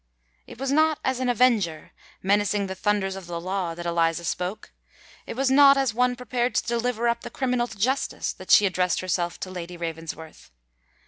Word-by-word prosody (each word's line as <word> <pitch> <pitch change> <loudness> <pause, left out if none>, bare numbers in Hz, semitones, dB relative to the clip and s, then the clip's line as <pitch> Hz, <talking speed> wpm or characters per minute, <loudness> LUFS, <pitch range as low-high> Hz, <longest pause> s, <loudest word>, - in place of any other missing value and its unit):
It - - -11
was 270 0 -2
not 310 +1 +3
as 260 -1 0
an 255 -1 0
avenger, 215 -10 +1 0.3
menacing 205 +1 +2
the 190 - -4
thunders 195 0 0
of 190 -2 -9
the 170 -1 -4
law, 180 -1 -3
that 175 0 -7
Eliza 170 0 +1
spoke: 180 +5 -4 0.5
it - - -5
was 265 +1 +1
not 275 0 +7
as 270 -4 +1
one 250 +2 +2
prepared 245 0 -2
to - - +1
deliver 235 0 0
up 235 0 0
the - - -7
criminal 250 -2 -1
to 220 - -11
justice, 260 +7 -1
that - - -13
she 210 - +7
addressed 180 -1 0
herself 175 -2 -2
to 185 - -5
Lady 175 -1 -7
Ravensworth. 165 -1 -7
205 Hz, 190 wpm, -25 LUFS, 175-250 Hz, 0.5 s, not